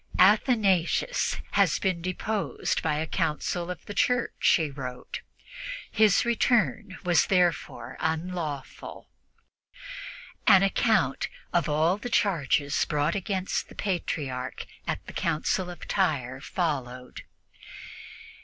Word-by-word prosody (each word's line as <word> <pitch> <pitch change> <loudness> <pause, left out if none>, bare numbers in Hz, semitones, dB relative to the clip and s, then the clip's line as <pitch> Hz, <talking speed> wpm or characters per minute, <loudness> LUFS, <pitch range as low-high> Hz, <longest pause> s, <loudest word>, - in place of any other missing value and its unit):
"Athanasius 205 - +3
has - - +3
been 185 -4 -1
deposed 195 +4 -2
by 155 -2 0
a 155 +2 -1
Council 170 +3 -1
of 180 -1 -6
the 205 - -6
Church," 245 +4 +2
he 155 -3 -2
wrote. 125 -2 -6 0.7
"His 215 0 +4
return 235 -3 +1
was 175 -2 +3
therefore 180 -3 0
unlawful." 160 -3 -4 1.4
An 195 0 +8
account 195 - +2 0.3
of 170 -2 +2
all 160 +5 +2
the 245 +4 -6
charges 150 - +2
brought 150 +2 0
against 195 -1 -2
the - - -13
Patriarch 145 -9 -3 0.2
at - - -3
the - - -9
Council 180 +4 0
of 175 - -9
Tyre 135 -9 0
followed. 130 -7 -3
175 Hz, 105 wpm, -27 LUFS, 150-200 Hz, 1.4 s, An